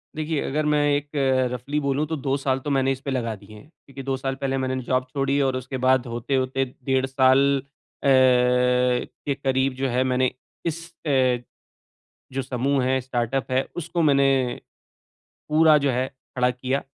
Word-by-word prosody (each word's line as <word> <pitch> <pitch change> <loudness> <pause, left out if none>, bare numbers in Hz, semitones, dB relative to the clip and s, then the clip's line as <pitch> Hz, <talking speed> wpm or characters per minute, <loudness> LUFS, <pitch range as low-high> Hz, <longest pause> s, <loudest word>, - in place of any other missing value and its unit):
देखिए, 155 -1 -2
अगर 150 +2 -1
मैं 150 -1 +2
एक 145 0 -3 0.4
रफ़ली 135 +5 -3
बोलूँ 140 +1 0
तो 160 - -2
2 135 -1 -1
साल 135 -1 0
तो 145 - -5
मैंने 135 -1 +2
इसपे 135 +1 -4
लगा 115 -4 -2
दिए 105 +2 -15
हैं, 125 +8 -14 0.2
क्योंकि 135 -1 -9
2 135 0 -1
साल 135 0 -3
पहले 135 0 -2
मैंने 130 0 -2
जॉब 130 +1 0
छोड़ी 140 0 +1
और 130 -1 +1
उसके 130 +1 -4
बाद 130 0 +2
होते-होते 130 +3 -1 0.2
डेढ़ 130 -1 +2
साल 135 +1 +4 0.5
अ, - - +1
के 125 +1 +3
करीब 135 -1 0
जो 135 +1 -1
है 125 +1 +1
मैंने 130 0 +1 0.3
इस 165 +1 -3 0.2
अ, 130 -3 +3 1.0
जो 135 - -1
समूह 130 +1 0
है, 130 +1 +1
स्टार्टअप 125 0 -2
है, 130 +1 +2
उसको 175 0 -2
मैंने, 135 -4 +2 0.9
पूरा 155 0 +6
जो 140 - +2
है 125 +1 0 0.3
खड़ा 125 0 +2
किया। 130 +2 -2
130 Hz, 170 wpm, -24 LUFS, 130-140 Hz, 1.0 s, पूरा